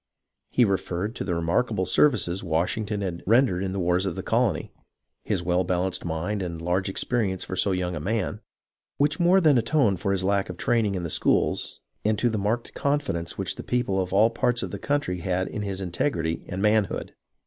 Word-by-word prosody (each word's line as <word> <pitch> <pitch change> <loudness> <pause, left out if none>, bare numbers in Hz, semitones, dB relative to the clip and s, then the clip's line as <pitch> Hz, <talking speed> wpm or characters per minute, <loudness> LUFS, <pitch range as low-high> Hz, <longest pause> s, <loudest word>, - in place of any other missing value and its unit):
He 125 - +4
referred 95 +1 -1
to - - -3
the 90 - -1
remarkable 95 +4 0
services 95 -8 +2
Wash 85 0 0
ington 105 -1 -3
had 85 -3 -4
rendered 115 -5 +3
in 95 - -2
the 95 - -3
wars 90 +2 +1
of 90 - -3
the - - -5
colony, - - 0 0.5
his 95 -5 -1
well 90 +1 +2
balanced 90 +1 0
mind 85 +5 -2
and 85 -3 -4
large 90 +3 0
experience 95 -2 0
for 95 - -5
so 100 - +2
young 90 -1 -1
a - - -3
man, 105 +4 -2 0.6
which 145 +3 +1
more 180 +2 +5
than 150 -8 +5
atoned 115 - +2
for 100 +2 -1
his 95 -1 0
lack 100 0 +1
of 90 - -6
training 110 -3 +1
in 90 - -3
the 85 - -3
schools, - - 0 0.2
and 110 0 +1
to 120 +3 +1
the 110 - -1
marked 110 +4 -1
confidence 140 -13 -1
which 95 -2 -2
the - - -6
people 120 -6 0
of 90 - -4
all 105 +4 +4
parts 120 +1 0
of - - -4
the - - -5
country 140 -11 -1
had 90 +1 -1
in 105 - -5
his 100 -2 -3
integrity 85 - -1
and 95 +2 -3
manhood. 105 -1 +1
95 Hz, 205 wpm, -25 LUFS, 90-115 Hz, 0.6 s, more